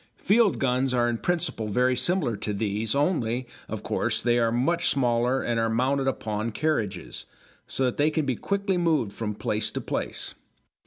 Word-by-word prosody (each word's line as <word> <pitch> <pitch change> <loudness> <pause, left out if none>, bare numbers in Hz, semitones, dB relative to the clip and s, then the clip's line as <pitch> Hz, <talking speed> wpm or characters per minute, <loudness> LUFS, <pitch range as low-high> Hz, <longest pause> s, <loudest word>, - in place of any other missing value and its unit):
Field 215 0 +3
guns 130 0 +1
are 120 -1 +3
in 120 -1 -1
principle 170 -11 -1
very 125 +4 +2
similar 150 - +1
to 105 +1 -3
these, 105 +3 -1
only, 130 -6 0 0.2
of - - -5
course, - - 0
they 120 0 +2
are 115 -1 +2
much 150 +9 +1
smaller 125 0 +1
and 120 -1 0
are 115 0 +1
mounted 135 +4 +1
upon 110 -3 -2
carriages, 105 - -2 0.4
so 135 - -1
that 125 - -1
they 145 +2 +3
can 155 -1 -1
be 130 - 0
quickly 200 - -1
moved 155 -12 +1
from 105 -2 -4
place 105 +1 -1
to - - -4
place. - - -4
125 Hz, 175 wpm, -26 LUFS, 110-150 Hz, 0.4 s, Field